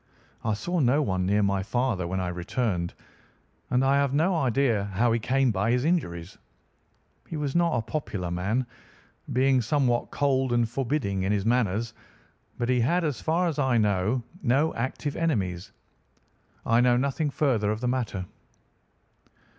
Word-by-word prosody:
I 110 Hz, -, 0 dB
saw 175 Hz, +11 st, -2 dB
no 140 Hz, +2 st, +3 dB
one 95 Hz, -6 st, -1 dB
near 105 Hz, +1 st, +2 dB
my 100 Hz, -1 st, +1 dB
father 110 Hz, -3 st, -1 dB
when 95 Hz, +2 st, -2 dB
I 90 Hz, -1 st, -2 dB
returned, 90 Hz, 0 st, -2 dB, 0.7 s
and 125 Hz, +2 st, +2 dB
I 135 Hz, +1 st, +4 dB
have 140 Hz, -1 st, +1 dB
no 170 Hz, +5 st, +2 dB
idea 125 Hz, -7 st, +1 dB
how 100 Hz, +4 st, +1 dB
he 115 Hz, -, +2 dB
came 130 Hz, +2 st, +2 dB
by 100 Hz, +1 st, 0 dB
his 125 Hz, +3 st, +1 dB
injuries. 90 Hz, -, -2 dB, 0.9 s
He 160 Hz, -, -5 dB
was 145 Hz, -2 st, -3 dB
not 170 Hz, -1 st, +2 dB
a 115 Hz, -, -1 dB
popular 105 Hz, -, -4 dB
man, 100 Hz, +9 st, -1 dB, 0.7 s
being 130 Hz, 0 st, +3 dB
somewhat 120 Hz, -1 st, +1 dB
cold 135 Hz, -2 st, +1 dB
and 120 Hz, -1 st, +2 dB
forbidding 120 Hz, -5 st, -1 dB
in 95 Hz, +2 st, 0 dB
his 100 Hz, -1 st, 0 dB
manners, 115 Hz, -2 st, +1 dB, 0.6 s
but 120 Hz, -, -1 dB
he 125 Hz, 0 st, +2 dB
had, 170 Hz, +10 st, +2 dB
as 145 Hz, -8 st, -2 dB
far 170 Hz, +3 st, +1 dB
as 155 Hz, -3 st, -2 dB
I 130 Hz, -4 st, +2 dB
know, 105 Hz, +3 st, +1 dB, 0.2 s
no 135 Hz, +6 st, +2 dB
active 130 Hz, +4 st, -3 dB
enemies. 95 Hz, -, -1 dB, 0.9 s
I 115 Hz, +1 st, +4 dB
know 125 Hz, 0 st, +4 dB
nothing 140 Hz, +4 st, 0 dB
further 125 Hz, -8 st, +1 dB
of 110 Hz, 0 st, -1 dB
the 125 Hz, -, -2 dB
matter. 120 Hz, -7 st, -2 dB
120 Hz, 160 wpm, -26 LUFS, 100-140 Hz, 0.9 s, I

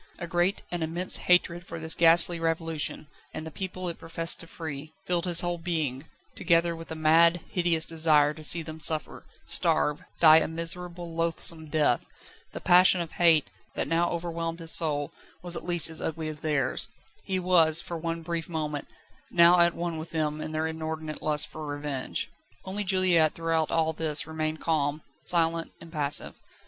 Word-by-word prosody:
A 175 Hz, -, -6 dB
great, 175 Hz, +3 st, 0 dB
an 175 Hz, -1 st, -3 dB
immense 170 Hz, +3 st, 0 dB
hatred 175 Hz, -1 st, +1 dB
for 165 Hz, -2 st, -8 dB
this 160 Hz, 0 st, +1 dB
ghastly 170 Hz, +1 st, +5 dB
Revolution 165 Hz, -2 st, -2 dB, 0.3 s
and 155 Hz, -, -6 dB
the 160 Hz, -, -7 dB
people 185 Hz, +1 st, -5 dB
it 170 Hz, -, -5 dB
professed 165 Hz, 0 st, -2 dB
to 165 Hz, -, -7 dB
free 155 Hz, -2 st, -8 dB
filled 175 Hz, -2 st, 0 dB
his 175 Hz, -2 st, +6 dB
whole 175 Hz, -1 st, -2 dB
being, 160 Hz, -5 st, -3 dB, 0.3 s
together 170 Hz, -1 st, +1 dB
with 165 Hz, 0 st, -11 dB
a -, -, -4 dB
mad, 165 Hz, +2 st, +4 dB
hideous 170 Hz, -3 st, +1 dB
desire 155 Hz, -2 st, +2 dB
to 155 Hz, -, -12 dB
see 165 Hz, +2 st, +4 dB
them 160 Hz, 0 st, -9 dB
suffer, 155 Hz, 0 st, +1 dB, 0.2 s
starve, 150 Hz, 0 st, +1 dB, 0.2 s
die 160 Hz, -1 st, +8 dB
a -, -, -2 dB
miserable, 170 Hz, +1 st, -1 dB
loathsome 165 Hz, -1 st, +3 dB
death. 150 Hz, -5 st, +1 dB, 0.4 s
The -, -, -7 dB
passion 180 Hz, +1 st, +5 dB
of 170 Hz, -2 st, -4 dB
hate, 165 Hz, -4 st, +3 dB, 0.2 s
that -, -, -2 dB
now 170 Hz, +1 st, +1 dB
overwhelmed 165 Hz, -1 st, -4 dB
his 165 Hz, -1 st, -6 dB
soul, 145 Hz, -3 st, -1 dB, 0.3 s
was 175 Hz, -1 st, -1 dB
at -, -, -7 dB
least 175 Hz, -2 st, +3 dB
as 160 Hz, 0 st, -3 dB
ugly 160 Hz, 0 st, -3 dB
as 150 Hz, -1 st, -8 dB
theirs. 150 Hz, -3 st, -1 dB, 0.4 s
He 190 Hz, -, -2 dB
was, 170 Hz, -3 st, +4 dB
for 170 Hz, -, -5 dB
one 165 Hz, 0 st, -4 dB
brief 170 Hz, 0 st, -4 dB
moment, 150 Hz, -3 st, -4 dB, 0.4 s
now 175 Hz, 0 st, +5 dB
at 170 Hz, 0 st, +4 dB
one 170 Hz, -2 st, -4 dB
with 160 Hz, -, -8 dB
them 155 Hz, -1 st, -2 dB
in 155 Hz, -, -6 dB
their 155 Hz, 0 st, -2 dB
inordinate 160 Hz, -1 st, -5 dB
lust 150 Hz, -1 st, +1 dB
for 155 Hz, -1 st, -9 dB
revenge. 145 Hz, -2 st, -4 dB, 0.4 s
Only 200 Hz, +2 st, -2 dB
Juliette 185 Hz, -5 st, +3 dB
throughout 165 Hz, -1 st, -1 dB
all 160 Hz, -1 st, 0 dB
this 155 Hz, -2 st, -1 dB
remained 155 Hz, 0 st, -4 dB
calm, 150 Hz, -2 st, -1 dB, 0.2 s
silent, 165 Hz, -1 st, 0 dB
impassive. 150 Hz, -4 st, -1 dB
165 Hz, 175 wpm, -27 LUFS, 155-170 Hz, 0.4 s, die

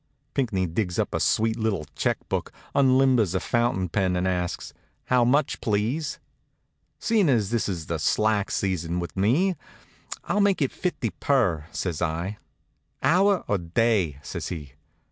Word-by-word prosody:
Pinckney 110 Hz, -9 st, 0 dB
digs 90 Hz, +1 st, -2 dB
up -, -, -1 dB
a -, -, 0 dB
sweet 110 Hz, +1 st, +1 dB
little 105 Hz, -8 st, -1 dB
check -, -, 0 dB
book, -, -, -2 dB, 0.2 s
unlimbers 130 Hz, -7 st, +4 dB
a -, -, +2 dB
fountain 115 Hz, -2 st, 0 dB
pen, 95 Hz, +1 st, 0 dB
and 90 Hz, +1 st, 0 dB
asks: 90 Hz, -1 st, -2 dB, 0.3 s
"How 125 Hz, -1 st, +3 dB
much, 135 Hz, +4 st, +2 dB
please?" 115 Hz, +9 st, -1 dB, 0.8 s
"Seein' 215 Hz, -8 st, +2 dB
as 110 Hz, -6 st, +2 dB
this 115 Hz, -3 st, 0 dB
is 85 Hz, -5 st, -4 dB
the 85 Hz, 0 st, -3 dB
slack 105 Hz, +5 st, +1 dB
season 90 Hz, -3 st, -1 dB
with 85 Hz, -, -5 dB
me, 140 Hz, -, +2 dB, 0.7 s
I'll 205 Hz, -, +1 dB
make 200 Hz, -1 st, +3 dB
it 140 Hz, -4 st, +1 dB
fifty 140 Hz, -, -2 dB
per," 95 Hz, -, +1 dB
says 85 Hz, -4 st, -3 dB
I. 85 Hz, +5 st, -2 dB, 0.6 s
"Hour 190 Hz, +2 st, +4 dB
or 105 Hz, -, +1 dB
day?" 90 Hz, -, +1 dB
says -, -, -5 dB
he. 75 Hz, -6 st, -7 dB
105 Hz, 150 wpm, -25 LUFS, 90-130 Hz, 0.8 s, unlimbers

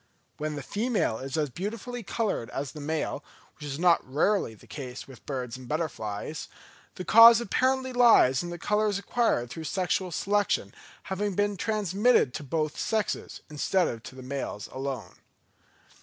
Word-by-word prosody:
When 150 Hz, 0 st, -3 dB
the 145 Hz, -, -5 dB
female 210 Hz, -, 0 dB
is 135 Hz, +3 st, -4 dB
as 150 Hz, -3 st, 0 dB
beautifully 230 Hz, -, -5 dB
coloured 210 Hz, -, -2 dB
as 135 Hz, 0 st, -4 dB
the 150 Hz, -, -9 dB
male, 150 Hz, -1 st, -2 dB, 0.3 s
which 150 Hz, -, -10 dB
is 140 Hz, -1 st, -4 dB
not 170 Hz, 0 st, +4 dB
rarely 155 Hz, -, +1 dB
the -, -, -18 dB
case 130 Hz, -3 st, -7 dB
with 135 Hz, -2 st, -14 dB
birds 125 Hz, -3 st, -4 dB
and 130 Hz, -1 st, -11 dB
butterflies, 150 Hz, -4 st, -3 dB, 0.5 s
the 185 Hz, -, -6 dB
cause 230 Hz, +1 st, +9 dB
apparently 260 Hz, +3 st, 0 dB
lies 230 Hz, -, +6 dB
in 175 Hz, -, -5 dB
the 175 Hz, -, -5 dB
colours 210 Hz, +3 st, +1 dB
acquired 200 Hz, -, 0 dB
through 160 Hz, +3 st, -6 dB
sexual 185 Hz, +2 st, -1 dB
selection 205 Hz, +5 st, 0 dB, 0.3 s
having 195 Hz, 0 st, -2 dB
been 205 Hz, +1 st, +1 dB
transmitted 210 Hz, -, +2 dB
to -, -, -5 dB
both 155 Hz, +2 st, -2 dB
sexes, 220 Hz, -2 st, -2 dB
instead 165 Hz, +4 st, +1 dB
of 115 Hz, -, -5 dB
to 130 Hz, -, -11 dB
the 130 Hz, -, -9 dB
males 130 Hz, -6 st, -4 dB
alone. 135 Hz, -3 st, -5 dB
165 Hz, 160 wpm, -28 LUFS, 135-210 Hz, 0.5 s, cause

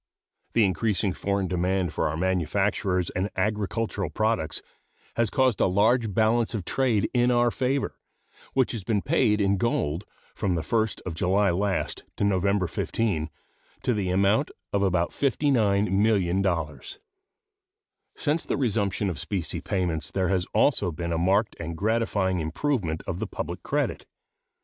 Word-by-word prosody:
The 115 Hz, -2 st, +4 dB
increasing 100 Hz, 0 st, 0 dB
foreign 100 Hz, 0 st, -1 dB
demand 90 Hz, -1 st, 0 dB
for -, -, 0 dB
our 80 Hz, -, -3 dB
manufactures 95 Hz, +1 st, 0 dB
and 95 Hz, +3 st, -1 dB
agricultural 105 Hz, -2 st, -1 dB
products 110 Hz, -2 st, -1 dB, 0.5 s
has 115 Hz, -2 st, +2 dB
caused 130 Hz, -2 st, +2 dB
a -, -, +5 dB
large 110 Hz, +4 st, +2 dB
balance 115 Hz, +3 st, +2 dB
of 100 Hz, -5 st, -4 dB
trade 120 Hz, -4 st, +1 dB
in 120 Hz, 0 st, +3 dB
our 120 Hz, -1 st, +3 dB
favor, 135 Hz, +3 st, -1 dB, 0.5 s
which 130 Hz, -2 st, +2 dB
has 115 Hz, -5 st, -4 dB
been 105 Hz, 0 st, 0 dB
paid 125 Hz, -8 st, +2 dB
in 100 Hz, -1 st, +2 dB
gold, 90 Hz, -5 st, -1 dB, 0.3 s
from 95 Hz, -4 st, -1 dB
the 80 Hz, -, -2 dB
1st 110 Hz, +4 st, 0 dB
of 90 Hz, -, -4 dB
July 95 Hz, +4 st, +2 dB
last 95 Hz, +2 st, -1 dB
to -, -, -1 dB
November 100 Hz, -1 st, +2 dB
15, 85 Hz, -2 st, -1 dB, 0.5 s
to 125 Hz, -, +2 dB
the 100 Hz, -4 st, -1 dB
amount 100 Hz, +9 st, +2 dB, 0.2 s
of 100 Hz, -, +2 dB
about 90 Hz, -3 st, +1 dB
$59,000,000. 100 Hz, -, +1 dB, 1.2 s
Since 155 Hz, +2 st, 0 dB
the -, -, -1 dB
resumption 105 Hz, -6 st, 0 dB
of 90 Hz, -4 st, -3 dB
specie 90 Hz, -6 st, -2 dB
payments 90 Hz, -4 st, -1 dB
there 95 Hz, -1 st, 0 dB
has 95 Hz, -2 st, 0 dB
also 105 Hz, -5 st, +3 dB
been 85 Hz, +2 st, -3 dB
a 80 Hz, -, 0 dB
marked 100 Hz, +5 st, +2 dB
and 85 Hz, 0 st, -5 dB
gratifying 100 Hz, -3 st, +1 dB
improvement 85 Hz, -, -1 dB
of 85 Hz, -, -4 dB
the 110 Hz, -, -2 dB
public -, -, -5 dB
credit. -, -, -2 dB
100 Hz, 145 wpm, -26 LUFS, 90-115 Hz, 1.2 s, a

